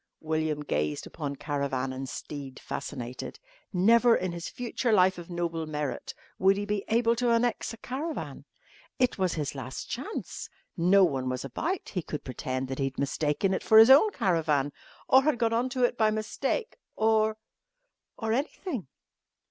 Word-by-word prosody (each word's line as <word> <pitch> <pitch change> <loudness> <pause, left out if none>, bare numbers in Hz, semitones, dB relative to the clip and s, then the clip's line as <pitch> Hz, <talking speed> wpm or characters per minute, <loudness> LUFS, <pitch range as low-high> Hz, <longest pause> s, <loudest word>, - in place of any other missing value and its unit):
William 155 -1 -1
gazed 75 - -1
upon 145 -3 -5
caravan 140 -2 -2
and 130 0 -5
steed 140 -3 -7
fascinated. 125 +1 -6 0.3
Never, 230 +5 +5
in 185 -1 -1
his 170 0 -5
future 245 0 -2
life 185 -3 +4
of 170 - -10
noble 170 -2 -2
merit, 150 -2 -4 0.2
would 195 +1 +4
he 205 - -2
be 205 -1 -1
able 230 +1 +3
to 245 0 +1
annex 235 +1 +1
a 230 - -9
caravan. 285 +8 -5 0.5
It 250 -5 +1
was 185 -2 +1
his 150 -4 -2
last 130 -2 -6
chance. 275 - -5 0.3
No 190 +2 +5
one 135 -7 +1
was 130 +1 -3
about. 330 - -3
He 180 - -2
could 150 -2 -6
pretend 130 +1 -3
that 135 - -4
he 135 - +1
had 135 0 -4
mistaken 150 +6 0
it - - -1
for 220 - +5
his 225 +4 +10
own 295 +11 +8
caravan 160 - +1 0.3
or 265 - +7
had 300 -2 +1
got 230 -1 +1
on 240 +3 +1
to 255 -1 -1
it 245 - +1
by 220 -1 +5
mistake 265 - -2 0.2
or 220 0 +2 0.8
or 220 -1 -1
anything. 275 - -3
185 Hz, 170 wpm, -28 LUFS, 145-230 Hz, 0.8 s, his